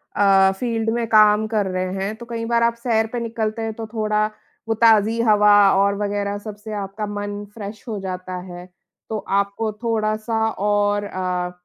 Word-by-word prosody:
अ, 195 -1 +5
field 225 -2 -1
में 235 -1 -1
काम 215 0 +5
कर 215 -3 0
रहे 185 0 -2
हैं, 195 +3 -3
तो 235 +1 -11
कई 230 -1 -3
बार 235 0 +2
आप 235 0 +3
सैर 225 -2 +1
पे 240 - -1
निकलते 225 -1 -3
हैं, 225 -1 -3
तो 225 0 -6
थोड़ा 215 -1 +1 0.4
वो 225 - +1
ताज़ी 225 0 +5
हवा 210 0 +6 0.3
और 200 0 +1
वग़ैरह 205 0 -2
सबसे 210 +1 -7
आपका 195 +2 -5
मन 205 0 -5
फ्रेश 210 -1 -8
हो 215 -3 -3
जाता 185 -1 -5 0.2
है। 175 0 -9 0.4
तो 220 - -2 0.2
आपको 200 +2 -2
थोड़ा-सा 220 0 0
और 205 0 0
अ, 180 -2 -3
210 Hz, 175 wpm, -21 LUFS, 200-225 Hz, 0.4 s, हवा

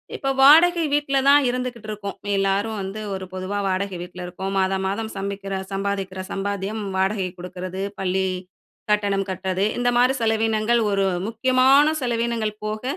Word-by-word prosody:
இப்ப 270 - -2
வாடகை 330 +5 +7
வீட்ல 285 -2 +1
தான் 285 -1 +6
இருந்துக்கிட்டிருக்கோம். 215 -5 -4 0.2
எல்லாரும் 200 +3 0
வந்து 195 +3 -5
ஒரு 190 0 -5
பொதுவா 185 +2 -3
வாடகை 190 0 -1
வீட்ல 180 0 -7
இருக்கோம். 190 +2 -5
மாதம் 190 0 0
மாதம் 220 +3 -3
சமைக்குற 195 0 -4 0.2
சம்பாதிக்குற 195 -1 -3
சம்பாத்தியம் 200 +2 -3 0.2
வாடகை 190 -1 0
கொடுக்குறது, 180 +1 -6 0.2
பள்ளி 190 0 0 0.7
கட்டணம் 200 -2 +1
கட்டுறது. 190 +1 -1
இந்த 245 0 +2
மாதிரி 255 +2 +4
செலவீனங்கள், 225 +1 +2
ஒரு 195 -1 +2 0.2
முக்கியமான 260 +6 +4
செலவீனங்கள் 230 -3 -1
போக 215 +2 -4
205 Hz, 135 wpm, -23 LUFS, 190-235 Hz, 0.7 s, வாடகை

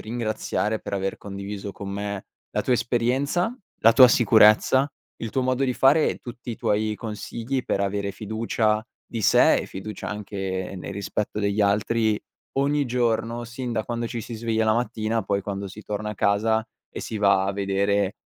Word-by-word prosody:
ringraziare 110 -1 -2
per - - -8
aver 95 0 -1
condiviso 100 0 -6
con 100 - -7
me 100 0 -4 0.2
la - - 0
tua 125 - +1
esperienza, 130 - 0 0.2
la 115 +1 +7
tua 125 0 +9
sicurezza, 120 +4 +5 0.3
il 115 - -5
tuo 130 - 0
modo 130 +1 +1
di 125 - +1
fare 145 +4 +5
e - - -3
tutti 120 0 -8
i 115 - -4
tuoi 105 +1 0
consigli 115 +4 -4
per 100 - 0
avere 100 0 -1
fiducia 110 +1 0 0.2
di 115 -2 -5
se, - - +6
e - - -2
fiducia 105 +3 -7
anche 95 -3 -4
nel 90 - -6
rispetto 100 +1 -3
degli 100 +1 0
altri 105 +2 +2 0.4
ogni 145 +1 +2
giorno, 120 -1 0
sin 120 +1 -5
da 110 -2 -1
quando 120 -1 -3
ci 115 0 -4
si 115 +2 -7
sveglia 110 0 0
la 110 - +4
mattina, 115 -1 -1
poi 100 0 0
quando 100 0 -4
si 100 +3 -9
torna 105 0 -3
a - - -5
casa 110 +3 +2 0.2
e - - -6
si 110 - -5
va 100 -2 +4
a 100 - 0
vedere 100 +1 0
110 Hz, 180 wpm, -24 LUFS, 100-120 Hz, 0.4 s, tua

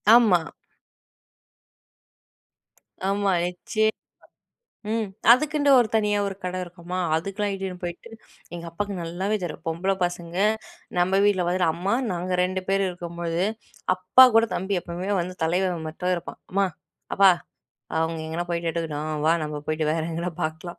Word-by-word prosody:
ஆமா. 220 -7 +6 2.7
ஆமா. 200 0 +1
நிச்சயம்மா 215 +5 0 1.0
ம். 225 -1 0 0.3
அதுக்குன்ட்டு 290 +2 +4
ஒரு 240 -3 +4
தனியா 210 -2 +2
ஒரு 195 -1 -3
கட 180 0 -3
இருக்குமா, 175 0 -7 0.2
அதுக்கெல்லாம் 195 +4 -2
இட்டுன்னு 190 -2 -4
போய்ட்டு. 175 +6 -6 0.5
எங்க 170 0 -7
அப்பாவுக்கு 200 +4 -3
நல்லாவே 175 +5 -2
தெரியும் 175 - -5
பொம்பள 170 +4 0
பசங்க 175 -1 -3 0.6
நம்ம 185 +2 +3
வீட்ல 200 -3 +3
வந்துட்டு, 180 0 +2
அம்மா 180 +4 -1 0.2
நாங்க 180 +1 -2
2 185 +1 0
பேரு 195 0 +2
இருக்கும்போழுது. 170 0 -3 0.5
அப்பா 185 +8 +7
கூட 225 0 +6
தம்பி 190 +1 -1
எப்பவுமே 175 +3 -5
வந்து 180 +1 -3
தலைவன் 175 0 0
மட்டும் 180 +3 -2
இருப்பான். 175 0 -7
"அம்மா, 195 +1 +2 0.5
அப்பா 195 0 +7 0.7
அவங்க 160 0 0
எங்கேனா 165 +2 -3
போய்ட்டு 170 -1 -1
எட்டுக்கட்டும் 155 -2 -3
வா 160 - +6
நம்ம 150 -1 -4
போய்ட்டு 155 0 0
வேற 160 +1 0
எங்கேனா 170 +2 -3
பார்க்கலாம். 160 +2 -4
180 Hz, 135 wpm, -25 LUFS, 170-195 Hz, 2.7 s, அப்பா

